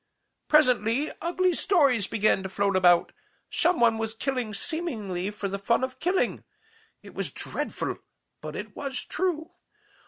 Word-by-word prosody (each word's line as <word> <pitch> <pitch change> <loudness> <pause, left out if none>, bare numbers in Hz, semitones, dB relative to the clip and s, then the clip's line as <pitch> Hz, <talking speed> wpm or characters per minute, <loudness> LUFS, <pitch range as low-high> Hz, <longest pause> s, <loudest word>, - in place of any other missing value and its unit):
"Presently 255 -2 +3
ugly 360 +1 +1
stories 280 - +3
began 215 -2 +2
to 190 - -5
float 200 0 0
about. 175 -2 +5 0.4
Some 355 -4 +2
one 230 -2 +4
was 225 0 -2
killing 250 -2 -2
seemingly 210 - -3
for 210 -1 -4
the 200 +1 -4
fun 235 +5 +1
of 260 0 -3
killing. 365 +2 0 0.6
It - - -12
was - - -3
dreadful, - - -4 0.4
but - - -7
it - - -7
was 270 -3 -3
true. 340 -4 -2
240 Hz, 145 wpm, -27 LUFS, 205-315 Hz, 0.6 s, about